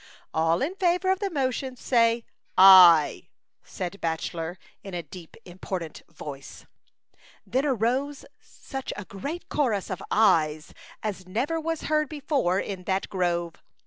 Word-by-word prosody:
" - - -32
All 165 +4 +1
in 320 +6 -2
favor 360 0 +2
of 380 - 0
the 400 -1 -2
motion 265 -4 -2
say 230 -2 +2 0.2
* - - -43
aye,' 180 -5 +8 0.2
" - - -58
said 185 +2 -6
Bachelor, 165 +1 -3 0.3
in 195 -2 -7
a 170 - -4
deep, 175 -2 -12
im 180 +1 -13
portant 170 -6 -5
voice 145 -4 -10 0.8
And - - -26
then 265 +3 +2
arose 265 +3 -1
such 270 -2 -8
a 205 - -7
chorus 250 - -3
of 185 - -4
''aye's" 155 -8 +2 0.3
as 195 -4 -4
never 270 - -1
was 325 0 -3
heard 305 -1 0
before 280 - 0
in 190 -3 -5
that 190 +1 -1
grove. 175 -3 -2
200 Hz, 150 wpm, -26 LUFS, 175-275 Hz, 0.8 s, aye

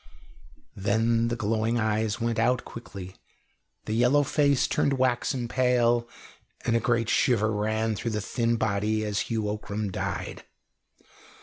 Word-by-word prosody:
Then 115 +3 +1
the 120 - -1
glowing 115 +1 0
eyes 110 -1 0
went 115 -1 -1
out 125 +2 +2
quickly, 95 -5 -9 0.7
the 110 - -2
yellow 125 +6 +4
face 140 -1 +2
turned 140 - +1
waxen 125 -1 0
pale, 120 -1 +2 0.6
and 115 - +2
a - - +4
great 115 -1 +1
shiver 110 -4 +2
ran 110 +1 0
through 115 - -3
the 105 -1 -2
thin 115 +2 0
body 110 0 0
as 105 -1 -1
Hugh 110 -3 -1
Ockram 105 -1 -3
died. - - -4
115 Hz, 135 wpm, -27 LUFS, 110-120 Hz, 0.7 s, yellow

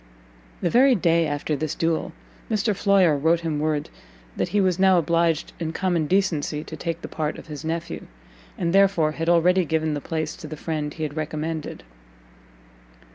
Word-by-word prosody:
The - - +1
very 260 +2 +5
day 170 -4 +2
after 145 +1 -2
this 155 +2 -3
duel, 165 -1 -1 0.4
Mr 215 -1 +1
Floyer 190 -5 +4
wrote 160 +4 +2
him 160 -3 -2
word 150 -1 -1 0.4
that - - -1
he 205 - +1
was 185 -2 +2
now 190 -1 +5
obliged 170 -1 +1
in 165 -1 -3
common 175 -4 0
decency 160 -5 0
to 160 - -8
take 165 +2 -4
the - - -4
part 155 -1 -3
of - - -10
his 150 -1 -8
nephew, 165 +1 -4 0.5
and 170 -1 -1
therefore 195 -6 +4
had 165 +2 -2
already 180 +2 +4
given 160 -1 0
the 145 - -3
place 155 0 -3
to 170 -4 -9
the 155 - -7
friend 150 -1 -3
he 160 - -4
had 150 -1 -4
recommended. 155 0 -4
165 Hz, 180 wpm, -24 LUFS, 155-180 Hz, 0.5 s, very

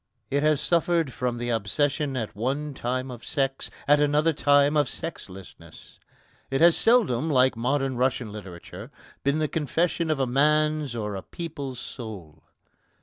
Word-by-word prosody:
It 140 +1 +1
has 155 -1 +3
suffered 170 -4 +1
from 125 -1 -2
the 120 0 -3
obsession 135 +6 0
at 110 -4 -4
one 140 +7 -2
time 130 +1 -3
of 120 -1 -10
sex, 135 -2 -2 0.2
at 145 +1 +5
another 150 +2 +2
time 145 0 +3
of 145 -2 +2
sexlessness. 95 - -9 0.5
It 135 0 0
has 170 0 +6
seldom, 165 - +3
like 130 -3 +3
modern 135 +2 -1
Russian 125 -3 0
literature, 95 -5 -9 0.3
been 140 +2 +1
the 155 -1 0
confession 160 +2 -1
of 155 -3 0
a 135 - +2
man's 150 +1 +1
or 105 -3 -3
a 95 - -5
people's 140 - -6
soul. 95 - -9
135 Hz, 150 wpm, -26 LUFS, 120-150 Hz, 0.5 s, has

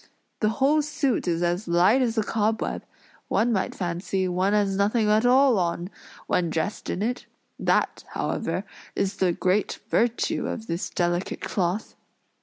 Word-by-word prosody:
The 215 - +2
whole 290 +3 +4
suit 280 -7 -1
is 170 0 0
as 175 +3 -1
light 180 +9 +4
as 235 -2 0
a 220 - +3
cobweb; 220 +1 -1 0.4
one 235 +2 +2
might 190 -3 -1
fancy 180 +1 -2
one 185 +2 +1
has 200 -2 +2
nothing 210 +3 +2
at 215 +3 +4
all 255 -3 +5
on, 175 +1 -2 0.3
when 175 -2 +1
dressed 160 +6 -3
in 195 - -2
it; 245 +3 -3 0.3
that, - - +1
however, - - -2 0.3
is 195 +1 -1
the 185 -2 +2
great 185 +4 0
virtue 235 +1 +1
of 220 - -4
this 170 -3 -3
delicate 175 +1 -1
cloth." 185 +2 -2
200 Hz, 155 wpm, -25 LUFS, 180-225 Hz, 0.4 s, all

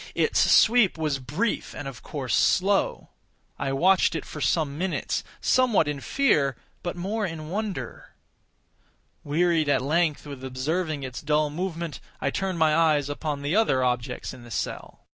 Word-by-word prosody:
Its - - +2
sweep 225 -6 +5
was 155 -4 -1
brief, 150 - -2
and 145 - -6
of 125 -5 -8
course 130 -7 -4
slow. 195 +2 +2 0.5
I 135 - -1
watched 175 +5 +3
it 160 - -3
for 150 - -8
some 150 -3 +1
minutes, 180 +3 -2 0.2
somewhat 245 -11 +3
in 145 -1 -2
fear, 150 - +2 0.3
but 175 - -4
more 200 +5 -2
in 160 -5 -4
wonder. 195 - -5 1.1
Wearied 160 0 +1
at 145 - +3
length 155 +1 +1
with 140 -3 -8
observing 145 +4 -2
its 130 -1 -6
dull 150 0 +1
movement, 170 -2 -4 0.2
I 140 - -1
turned 190 +1 -2
my 155 -2 +3
eyes 155 -4 +3
upon 145 -1 -3
the 145 +6 0
other 170 -13 +3
objects 125 0 -2
in 120 - -12
the 120 - -12
cell. 110 - -5
155 Hz, 160 wpm, -26 LUFS, 140-180 Hz, 1.1 s, sweep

